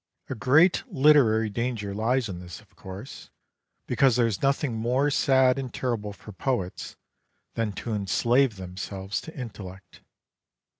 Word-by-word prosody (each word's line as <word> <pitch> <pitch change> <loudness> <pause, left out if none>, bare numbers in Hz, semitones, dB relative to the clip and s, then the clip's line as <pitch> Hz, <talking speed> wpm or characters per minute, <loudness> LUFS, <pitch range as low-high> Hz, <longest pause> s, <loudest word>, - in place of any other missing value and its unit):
A - - 0
great 145 - +4
literary 125 -7 +4
danger 115 -3 -3
lies 115 +4 0
in 90 -3 -6
this, 90 -6 -9
of - - -23
course, 95 +8 -10 0.6
because 135 -4 +3
there 120 -1 +3
is 110 -5 -2
nothing 140 -1 +1
more 125 +6 +1
sad 130 -2 +3
and 130 -2 -5
terrible 115 -5 -3
for 105 +1 -12
poets 95 -3 -3 0.6
than 115 -2 -1
to 115 +4 -5
enslave 115 +5 +2
themselves 95 +1 -5
to 160 - -11
intellect. 95 -6 -9
115 Hz, 140 wpm, -26 LUFS, 100-130 Hz, 0.6 s, great